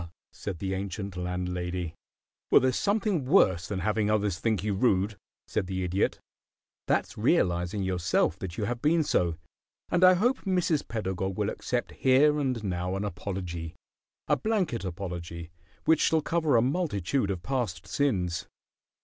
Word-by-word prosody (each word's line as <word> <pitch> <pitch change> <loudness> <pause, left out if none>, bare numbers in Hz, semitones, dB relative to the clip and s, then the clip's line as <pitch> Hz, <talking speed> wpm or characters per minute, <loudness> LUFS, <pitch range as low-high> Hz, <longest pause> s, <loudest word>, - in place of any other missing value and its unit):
said 95 -4 -6
the 95 +2 -3
ancient 95 0 -4
landlady. 90 -1 -3 0.6
"Well, - - +7
there's 130 -1 +1
something 200 -6 +1
worse 95 - +4
than 95 -3 -3
having 105 +2 +1
others 105 -3 +1
think 110 -4 0
you 105 -1 0
rude," 100 -1 +2 0.3
said 95 - -2
the 95 0 -2
Idiot. 90 +2 0 0.7
"That's - - 0
realizing 90 +3 +1
yourself 90 -1 +1
that 90 -3 -6
you 110 - -1
have 120 +3 -2
been 160 +2 +3
so, 85 - +1 0.6
and 180 +1 +3
I 185 0 +8
hope 245 +8 +2
Mrs. 180 -6 0
Pedagog 95 -3 -3
will 105 0 0
accept 120 -1 -2
here 145 +3 +4
and 130 -5 -1
now 90 -1 -2
an 100 +2 -2
apology 90 -3 -5 0.5
a - - +4
blanket 195 - -1
apology 85 -2 -6 0.3
which 160 -1 +4
shall 160 -1 +3
cover 155 -5 +2
a 115 - +4
multitude 130 - 0
of 90 -3 -3
past 110 -10 -2
sins." 95 - 0
100 Hz, 150 wpm, -28 LUFS, 90-135 Hz, 0.7 s, I